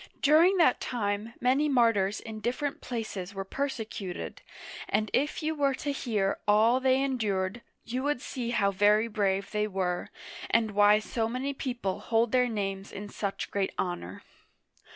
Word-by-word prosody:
During 330 +6 +6
that 320 -8 +4
time 210 -1 -2
many 270 +4 +2
martyrs 225 -6 +3
in 220 -1 -8
different 280 +7 -2
places 210 -5 -5
were 195 0 -4
persecuted, 220 -7 -4 0.5
and 215 0 0
if 295 +3 0
you 315 +1 0
were 280 -3 +1
to 290 +1 -3
hear 215 -8 -1
all 220 +4 +5
they 260 +1 +3
endured, 215 -5 -1 0.2
you 250 +3 -3
would 290 -1 0
see 250 -2 -4
how 200 -4 +2
very 210 +3 +4
brave 200 -3 -1
they 210 0 0
were, 185 -3 -2 0.4
and 225 - +2
why 205 +1 +6
so 225 +1 -2
many 260 +4 -2
people 245 -8 -3
hold 225 0 +1
their 250 -1 +3
names 195 -3 -3
in 205 +1 -7
such 200 -1 -4
great 195 -1 -1
honor. 135 - -4
225 Hz, 155 wpm, -29 LUFS, 200-255 Hz, 0.5 s, During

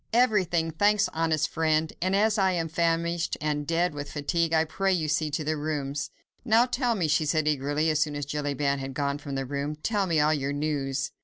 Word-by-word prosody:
"Everything, 185 -9 +2
thanks, 205 +5 +2
honest 160 -2 +1
friend, 160 -1 0
and 185 +2 +1
as 215 +1 +2
I 190 -1 +3
am 165 -2 -1
famished 170 +1 0
and 150 -1 -2
dead 170 0 +1
with 145 0 -6
fatigue, 165 +3 0
I 160 0 +3
pray 195 +5 0
you 165 -4 0
see 150 +1 0
to 150 +2 -2
the 155 +1 -1
rooms." 145 -2 -3 0.3
"Now 235 0 +4
tell 245 -2 0
me," 175 -6 0
she 150 +1 +2
said 155 0 0
eagerly, 150 +2 +1
as 155 - 0
soon 150 -1 0
as 145 -1 -3
Jellyband 145 -1 -1
had 135 0 -6
gone 140 0 -1
from 140 -2 -6
the 135 0 -2
room, 140 +3 -3
"tell 200 +5 -1
me 165 -3 +2
all 150 +1 +3
your 140 -1 -2
news." 140 -2 -2
155 Hz, 215 wpm, -27 LUFS, 145-170 Hz, 0.3 s, Now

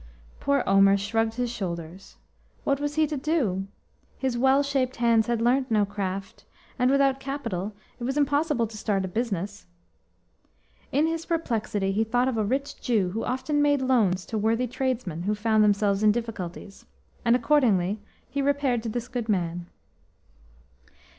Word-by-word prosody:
Poor 280 -1 +1
Omer 195 0 +5
shrugged 225 +3 -1
his 245 -1 -1
shoulders. 180 -4 -6 0.5
What 275 -1 +1
was 290 0 -2
he 315 0 +4
to 300 -1 -3
do? 260 - 0 0.5
His 260 -2 -1
well 265 +3 +4
shaped 270 -2 0
hands 230 -2 +3
had 235 -1 0
learnt 255 +2 +2
no 210 -2 +3
craft, 195 -1 -5 0.4
and 250 +1 +3
without 275 -1 +3
capital 230 -8 -4 0.2
it - - -6
was 265 +4 -1
impossible 290 -3 +2
to 215 0 -9
start 200 -3 0
a - - -3
business. 200 -2 -3 1.2
In 290 +3 +3
his 330 0 -2
perplexity 220 - -1
he 210 +3 +1
thought 245 +3 +1
of 260 - 0
a - - +2
rich 275 +7 -2
Jew 205 -7 +1
who 225 +4 -3
often 290 +3 0
made 290 -2 +3
loans 210 -8 +2
to 220 - -3
worthy 225 +4 +1
tradesmen 250 -9 -2
who 205 +4 0
found 215 0 +2
themselves 200 -1 +2
in 215 -1 +5
difficulties, 205 -4 -6 0.4
and 235 -1 +4
accordingly 225 -7 +2 0.3
he 280 - -2
repaired 275 -4 +1
to 225 - -4
this 240 +2 -4
good 245 -3 -4
man. 175 -3 -1
230 Hz, 160 wpm, -26 LUFS, 200-265 Hz, 1.2 s, Omer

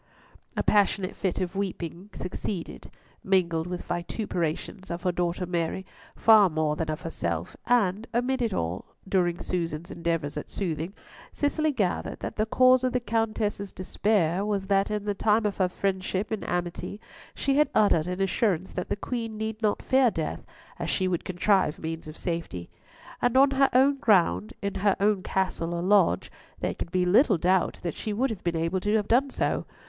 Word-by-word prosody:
A - - +1
passionate 200 -2 +2
fit 190 -3 -1
of 185 +1 -3
weeping 185 -1 -4
succeeded, 180 0 -5 0.3
mingled 170 -4 +1
with 180 0 -4
vituperations 175 0 -3
of 170 0 -4
her 180 - +2
daughter 175 +1 -1
Mary, 175 +1 -2 0.3
far 215 -4 +6
more 155 -1 0
than 160 0 -3
of 155 +2 -3
herself, 85 - -3
and 215 -3 +2
amid 250 +2 0
it 230 -2 +1
all, 85 - -3
during 175 -3 +1
Susan's 170 -2 -3
endeavours 165 -4 -2
at 150 - -5
soothing, 170 0 -3 0.4
Cicely 305 +1 0
gathered 205 -10 -1
that - - -4
the 215 +1 0
cause 255 +2 +5
of 255 - +1
the 250 - +2
Countess's 215 -3 -1
despair 185 -2 +1
was 205 -2 -1
that 195 +1 +2
in 210 -1 -2
the 205 - 0
time 215 +2 +2
of 205 - -1
her 185 -2 +2
friendship 190 +2 -2
and 220 - -2
amity, 175 +3 -3 0.4
she 275 0 +1
had 300 - +4
uttered 175 -6 +4
an 180 +2 -1
assurance 190 -2 0
that 180 - -4
the - - 0
Queen 225 +1 -4
need 220 0 -4
not 210 -2 0
fear 260 -2 +4
death, 160 -7 -4 0.4
as - - -2
she 185 - +1
would 175 -2 -1
contrive 185 -2 +2
means 160 0 -5
of 155 - -9
safety. 165 - -4 0.5
And 245 +1 +2
on 275 +1 +6
her 275 0 +4
own 275 +3 +4
ground, 170 - +3
in 200 -1 -1
her 200 -1 +3
own 205 -1 +2
Castle 185 -3 -1
or 170 - -2
Lodge, 185 - +3 0.3
there - - -1
could - - -6
be 180 -1 +2
little 210 - +5
doubt 180 +2 +1
that 170 -3 -2
she 215 - -4
would 250 +4 0
have 210 - -6
been 170 -1 0
able 165 +3 0
to 205 +3 0
have 210 -2 +1
done 265 +4 +3
so. - - -1
190 Hz, 185 wpm, -27 LUFS, 170-215 Hz, 0.5 s, far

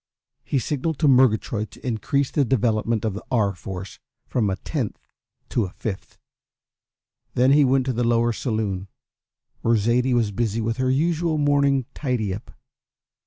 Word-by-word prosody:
He 140 - -1
signalled 145 +4 -1
to 155 - +2
Murgatroyd 115 -4 +3
to - - -15
increase 130 +4 0
the 145 - +2
development 115 -2 +1
of 110 - 0
the 100 - -7
R. 105 -6 +2
Force 95 +2 -8 0.3
from 110 -5 0
a 95 - 0
tenth 130 0 -3 0.5
to 115 - +1
a - - -6
fifth. 95 +1 -6 1.2
Then 130 +2 +4
he 145 +1 +6
went 130 -1 +3
to 130 - 0
the 120 +1 0
lower 120 0 +2
saloon, 105 -5 -2 0.7
where 115 0 +3
Zaidie 120 +4 +2
was 115 -4 +1
busy 110 +1 -1
with 115 +1 -1
her 130 0 +1
usual 160 +3 +1
morning 140 -3 +2
tidy 120 -9 -1
up. 100 - -8
120 Hz, 160 wpm, -23 LUFS, 110-135 Hz, 1.2 s, he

